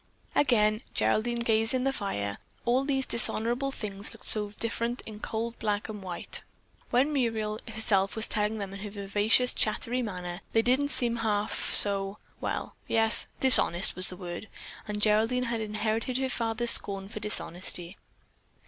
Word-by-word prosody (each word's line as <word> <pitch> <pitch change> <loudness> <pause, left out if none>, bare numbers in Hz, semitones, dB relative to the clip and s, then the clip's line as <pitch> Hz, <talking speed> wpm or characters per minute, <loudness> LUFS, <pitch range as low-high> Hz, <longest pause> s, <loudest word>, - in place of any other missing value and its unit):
Again 215 -6 +2
Geraldine 220 - +1
gazed 225 +2 +2
in 255 - 0
the 270 0 0
fire. 100 - -4 0.3
All 245 +3 +2
these 270 -1 0
dishonorable 235 +4 +1
things 205 -5 -3
looked - - -13
so 210 -1 +4
different 235 +1 -2
in 215 -1 -9
cold 230 +2 -4
black 210 0 -2
and 210 -2 -7
white. 180 -2 -2 0.5
When 265 +5 +2
Muriel 220 -5 -1
herself 215 -3 +2
was 220 0 +4
telling 210 +1 -1
them 200 -2 -6
in 195 - -8
her 210 +1 -6
vivacious, 205 +4 +1
chattery 235 +3 0
manner, 180 -4 -6
they 225 - +3
didn't 265 +4 +1
seem 235 -4 +1
half 215 -2 -2
so, 200 0 +5 0.2
well, - - -4
yes, 225 0 +3
dishonest 195 -8 +5
was 185 0 +2
the 180 - -6
word, 175 +3 -7 0.4
and 210 0 -3
Geraldine 225 +4 +2
had 235 -2 -2
inherited 220 +3 -2
her 265 0 -1
father's 230 -1 +2
scorn 195 -1 +1
for 215 - -7
dishonesty. 180 -3 -1
220 Hz, 155 wpm, -28 LUFS, 200-235 Hz, 0.5 s, so